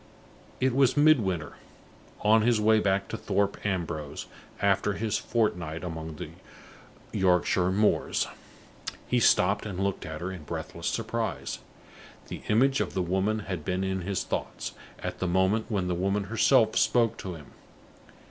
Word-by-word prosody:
It 130 -1 +2
was 135 0 +3
Midwinter, 105 - +3 0.6
on 110 +1 +5
his 115 0 +3
way 110 +1 +4
back 100 -1 +1
to - - -4
Thorpe 100 0 -1
Ambrose, 80 -7 -3 0.3
after 100 +1 +2
his 110 0 -1
fortnight 90 -8 -1
among 80 -2 -5
the - - -7 0.9
Yorkshire 90 0 +3
moors. 105 +3 +2 0.8
He 125 - +2
stopped 100 -2 +4
and 95 -4 -5
looked 100 0 -1
at 80 -1 -6
her, 90 +3 -4
in 90 -3 -7
breathless 75 - -5
surprise. - - -2 0.7
The - - -6
image 135 +5 +3
of - - -3
the 95 - +1
woman 95 +5 0
had 95 -6 -5
been 90 +4 -1
in 95 -1 -1
his 95 +2 -2
thoughts, - - -4 0.3
at - - -5
the 95 - -1
moment 95 +5 +2
when 100 -5 0
the 90 - 0
woman 100 +3 0
herself 110 +2 +3
spoke 115 -2 +3
to 90 -2 -6
him. 75 -3 -13
100 Hz, 150 wpm, -28 LUFS, 90-110 Hz, 0.9 s, on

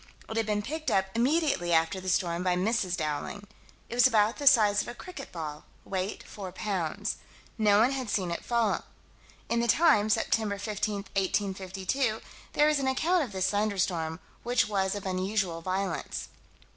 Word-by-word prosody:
It 220 - -6
had 225 -1 0
been 210 -1 0
picked 310 +6 -3
up 190 0 +2
"immediately" 260 - +1
after 165 +3 +2
the 185 - -3
storm 175 -1 +1
by 180 -1 +2
Mrs. 185 -1 0
Dowling. 155 +6 -3 0.4
It - - -7
was 245 +2 +6
about 220 -2 +2
the 285 - -2
size 210 -6 +6
of - - -8
a 240 - -6
cricket 365 +6 -9
ball: 155 -3 -6 0.2
weight 190 +1 -3
four 195 -3 -8
pounds. 185 -6 -2 0.4
No 210 -2 +4
one 245 +4 +4
had 260 -4 -3
seen 185 -4 0
it 170 - -4
fall. 235 -3 +1 0.6
In 235 - +1
the 235 - +1
Times, 225 -7 +4
Sept. - - -3
15, 215 -2 +1 0.4
1852, 195 +3 -1 0.3
there 295 - +4
is 305 -1 +3
an 270 - -1
account 320 +6 +2
of 245 - -6
this 190 -2 0
thunderstorm, 185 -6 0 0.2
which 240 -2 +2
was 195 -2 0
of 205 - -6
unusual 185 -2 -1
violence. 185 0 -3
205 Hz, 170 wpm, -29 LUFS, 185-235 Hz, 0.6 s, was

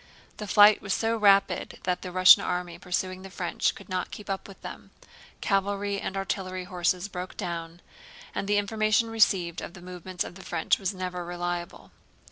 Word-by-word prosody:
The 210 - -6
flight 205 +1 +7
was 195 - -1
so 225 0 0
rapid 200 -2 +3
that 180 -1 -1
the 180 - -6
Russian 185 +1 +8
army 180 -1 -3
pursuing 185 +1 -2
the 195 - -9
French 180 -2 -1
could - - -12
not 185 -1 -2
keep 210 -1 -7
up 190 - -4
with 195 - -13
them; - - -9 0.5
cavalry 200 0 0
and 195 - -4
artillery 185 -1 -3
horses 180 0 -1
broke 180 -2 -7
down, 170 -2 -5 0.5
and 195 - -3
the 205 0 +2
information 215 +2 +1
received 185 -6 +2
of - - -8
the - - -11
movements 180 0 -5
of - - -8
the 190 +1 -12
French 165 -2 +1
was 190 -1 -1
never 180 -2 -4
reliable. 175 0 -5
185 Hz, 180 wpm, -27 LUFS, 180-200 Hz, 0.5 s, Russian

